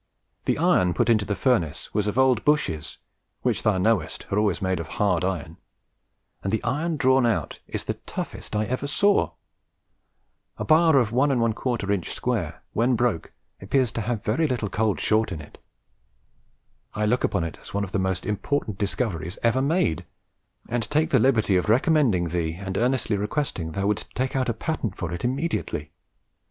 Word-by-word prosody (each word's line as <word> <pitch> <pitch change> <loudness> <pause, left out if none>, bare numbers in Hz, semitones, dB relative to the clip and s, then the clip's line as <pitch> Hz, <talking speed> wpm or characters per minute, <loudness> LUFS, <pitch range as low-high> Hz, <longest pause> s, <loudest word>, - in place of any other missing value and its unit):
The - - +1
iron 90 -2 +3
put - - +2
into 105 -3 +3
the 105 - -1
furnace 85 - 0
was 105 -1 0
old 130 -4 +4
Bushes, 90 - 0 0.5
which - - +1
thou 105 -3 +2
knowest 95 -3 0
are 100 - +2
always 105 -4 +1
made 95 -3 0
of 85 - -5
hard 95 -4 +2
iron, 85 -3 -3 0.8
and 95 - -2
the 110 - 0
iron 155 +4 -1
drawn 130 -1 +4
out 115 -2 0
is - - -4
the - - -2
toughest - - -6
I 105 +1 +1
ever 130 +5 -2
saw. 200 +9 +2 1.2
A - - -3
bar 160 +1 +5
1 125 - +5 0.2
1/4 115 -4 0
inch 90 -4 -2
square, 90 - -2
when 120 +3 +2
broke, 115 -8 0 0.3
appears 125 +4 +1
to 115 - -3
have 110 0 -2
very 135 +10 +1
little 120 -6 -2
cold 110 -2 +1
short 110 -1 +2
in 85 - -4
it. 75 - -13 1.4
I 105 - 0
look 125 +4 +1
upon 95 -4 +1
it 85 - -6
as - - -11
one 100 - +1
of 95 - -5
the 100 - 0
most 95 0 -1
important 105 0 -2
discoveries 95 -5 -2
ever 120 +3 +3
made, 140 - +1 0.6
and 120 0 -1
take 155 +2 +1
the - - +5
liberty 110 -7 +3
of 90 - -1
recommending 120 - +3
thee 80 -1 -1
and 95 +1 -5
earnestly 120 -3 +1
requesting 100 - -2
thou 100 +3 -1
wouldst 105 0 -1
take 130 +1 -1
out 130 -2 +1
a - - +1
patent 115 - -3
for 85 -1 -4
it 85 - -5
immediately.... 130 - -2
110 Hz, 175 wpm, -25 LUFS, 95-130 Hz, 1.4 s, bar